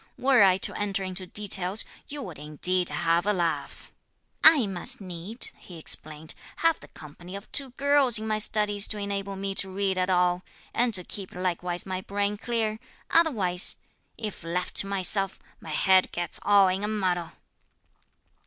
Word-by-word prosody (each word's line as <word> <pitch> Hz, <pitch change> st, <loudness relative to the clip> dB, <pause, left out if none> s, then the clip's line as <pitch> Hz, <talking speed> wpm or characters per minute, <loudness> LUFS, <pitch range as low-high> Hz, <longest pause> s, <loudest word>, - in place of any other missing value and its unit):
Were 260 Hz, -3 st, +4 dB
I 190 Hz, -2 st, +6 dB
to -, -, -1 dB
enter 200 Hz, -1 st, -2 dB
into 185 Hz, 0 st, -3 dB
details, 195 Hz, 0 st, 0 dB, 0.2 s
you 290 Hz, -1 st, -6 dB
would 170 Hz, -, -9 dB
indeed 175 Hz, +5 st, +2 dB
have 170 Hz, +3 st, 0 dB
a 210 Hz, -, +3 dB
laugh. 170 Hz, -4 st, -3 dB, 0.5 s
'I 310 Hz, -6 st, +7 dB
must 190 Hz, -3 st, -1 dB
needs,' 185 Hz, +4 st, -6 dB
he 175 Hz, -, -12 dB
explained, 155 Hz, 0 st, -2 dB, 0.2 s
'have 330 Hz, -1 st, +1 dB
the -, -, -13 dB
company 175 Hz, +5 st, -11 dB
of 200 Hz, -, -10 dB
two 275 Hz, -2 st, 0 dB
girls 280 Hz, -4 st, +4 dB
in 215 Hz, -, -3 dB
my 215 Hz, -1 st, -1 dB
studies 210 Hz, -1 st, +3 dB
to 215 Hz, -, -2 dB
enable 200 Hz, -1 st, -4 dB
me 195 Hz, 0 st, -3 dB
to 195 Hz, 0 st, +2 dB
read 190 Hz, 0 st, -1 dB
at 185 Hz, +1 st, 0 dB
all, 180 Hz, -1 st, +2 dB, 0.3 s
and 240 Hz, 0 st, +1 dB
to 180 Hz, -, +2 dB
keep 190 Hz, +1 st, -8 dB
likewise 180 Hz, -1 st, -2 dB
my 185 Hz, -1 st, -4 dB
brain 200 Hz, +1 st, -2 dB
clear. 220 Hz, 0 st, -2 dB, 0.3 s
Otherwise, 205 Hz, -, +4 dB, 0.4 s
if 210 Hz, -6 st, -6 dB
left 175 Hz, +2 st, -3 dB
to 195 Hz, -, 0 dB
myself, 195 Hz, 0 st, +1 dB, 0.2 s
my -, -, -11 dB
head 185 Hz, +4 st, +4 dB
gets 175 Hz, 0 st, -5 dB
all 200 Hz, -1 st, +5 dB
in 185 Hz, +2 st, -1 dB
a -, -, 0 dB
muddle.' 185 Hz, -5 st, -2 dB
195 Hz, 170 wpm, -26 LUFS, 180-210 Hz, 0.5 s, I